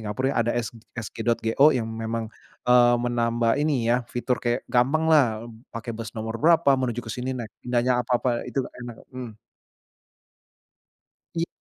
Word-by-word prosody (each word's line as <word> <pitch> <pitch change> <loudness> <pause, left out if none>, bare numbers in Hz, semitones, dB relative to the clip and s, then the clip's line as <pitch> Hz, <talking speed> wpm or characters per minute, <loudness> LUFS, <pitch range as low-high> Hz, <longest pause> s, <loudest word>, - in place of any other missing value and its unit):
Singapura 105 +4 -4
ada 115 -2 +1
s 120 -2 -1 0.3
sg.go 115 +3 +1
yang 115 -3 -1
memang, 115 0 -4 0.4
eee, 120 -1 +6
menambah 120 -1 +1
ini 140 -6 +1
ya, 120 - +4 0.2
fitur 125 +1 -1
kayak 120 +1 0
gampang 135 +6 +2
lah, 155 -3 +7 0.5
pakai 115 +1 -5
bus 115 -1 -6
nomor 110 0 -4
berapa, 160 -1 +4
menuju 120 -2 -1
ke 110 - -6
sini 125 +1 -3
naik 115 -3 -6 0.2
nanya 125 0 +2
apa-apa 120 -1 0
itu 135 - -1 0.2
enak 120 -2 -7 0.2
mhm. 125 -3 -6 2.1
Iya. 165 - +1
120 Hz, 145 wpm, -25 LUFS, 115-125 Hz, 2.1 s, lah